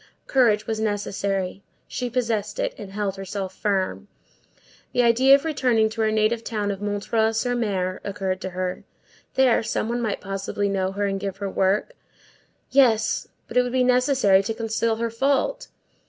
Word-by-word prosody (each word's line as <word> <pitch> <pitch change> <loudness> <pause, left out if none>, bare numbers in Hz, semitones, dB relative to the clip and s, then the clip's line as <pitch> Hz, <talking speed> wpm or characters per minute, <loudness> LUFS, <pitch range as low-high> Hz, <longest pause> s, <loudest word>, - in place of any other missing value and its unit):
Courage 225 -5 +3
was 220 -1 -2
necessary; 200 -3 -2 0.3
she 250 -1 -3
possessed 225 -4 -1
it, - - -1
and 200 -2 -9
held 200 -2 -2
herself 195 0 -5
firm. 195 -1 -1 0.9
The 245 - +3
idea 255 +4 +6
of 280 +3 -1
returning 250 -8 +2
to 225 0 -3
her 220 0 +2
native 220 +2 +1
town 210 -3 -2
of 195 0 -6
M. 205 0 -1 0.3
sur 225 +3 -1
M. 195 -6 -1
occurred 190 -1 -3
to 190 - -3
her. 185 0 -4 0.5
There, 260 -3 +4
some 220 0 -2
one 240 +1 -1
might 220 -3 -1
possibly 195 +1 -3
know 190 -1 0
her 205 +1 -1
and 195 -1 -1
give 195 -1 -4
her 200 -1 -4
work; 195 - +1 0.8
yes, 245 -5 +3 0.2
but - - -4
it - - +7
would 245 0 -3
be 255 -1 +3
necessary 250 -6 +4
to 220 +3 -3
conceal 225 0 0
her 230 0 -2
fault. 285 - 0
215 Hz, 170 wpm, -24 LUFS, 195-240 Hz, 0.9 s, it